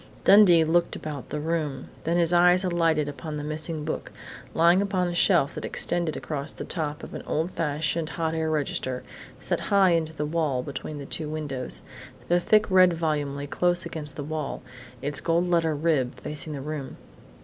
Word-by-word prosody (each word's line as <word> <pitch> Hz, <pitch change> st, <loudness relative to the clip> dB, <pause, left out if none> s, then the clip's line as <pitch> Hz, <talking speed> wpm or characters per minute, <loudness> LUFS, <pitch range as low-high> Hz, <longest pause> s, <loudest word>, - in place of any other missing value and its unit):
Dundee 195 Hz, -5 st, +7 dB
looked 170 Hz, +2 st, +1 dB
about 150 Hz, -4 st, -6 dB
the 150 Hz, -, -3 dB
room, 150 Hz, -4 st, -2 dB, 0.2 s
then 170 Hz, +1 st, +1 dB
his 170 Hz, 0 st, +3 dB
eyes 180 Hz, +1 st, +5 dB
alighted 165 Hz, -4 st, +1 dB
upon 150 Hz, +1 st, -6 dB
the 145 Hz, -, -4 dB
missing 155 Hz, 0 st, -4 dB
book, 155 Hz, -, -4 dB, 0.4 s
lying 170 Hz, +3 st, +5 dB
upon 190 Hz, -3 st, 0 dB
a 175 Hz, -, -3 dB
shelf 170 Hz, -4 st, +3 dB
that -, -, -6 dB
extended 170 Hz, -3 st, 0 dB
across 145 Hz, -1 st, -4 dB
the -, -, -7 dB
top 150 Hz, -4 st, -3 dB
of -, -, -9 dB
an -, -, -5 dB
old 160 Hz, +4 st, -1 dB
fashioned 155 Hz, +1 st, -1 dB
hot 160 Hz, -1 st, -2 dB
air 160 Hz, -1 st, -1 dB
register, 135 Hz, -4 st, -2 dB, 0.4 s
set -, -, -1 dB
high 195 Hz, -2 st, +5 dB
in 165 Hz, -1 st, +2 dB
the 155 Hz, -1 st, -5 dB
wall 150 Hz, -5 st, -1 dB
between 145 Hz, +2 st, -6 dB
the 140 Hz, -, -7 dB
two 155 Hz, +2 st, -4 dB
windows. 145 Hz, -5 st, -2 dB, 0.5 s
The 175 Hz, +1 st, +4 dB
thick 215 Hz, +4 st, +4 dB
red 185 Hz, -1 st, +6 dB
volume 150 Hz, -4 st, -1 dB
lay 140 Hz, -, -4 dB
close 175 Hz, +4 st, +1 dB
against 155 Hz, -3 st, -4 dB
the 145 Hz, -, -5 dB
wall, 150 Hz, -3 st, -4 dB, 0.4 s
its 145 Hz, 0 st, +2 dB
gold 170 Hz, +1 st, +1 dB
lettered 165 Hz, -3 st, +1 dB
"rib" 140 Hz, -7 st, +1 dB
facing 150 Hz, +1 st, -5 dB
the 140 Hz, -, -5 dB
room. 145 Hz, -2 st, -6 dB
160 Hz, 185 wpm, -26 LUFS, 150-170 Hz, 0.5 s, Dundee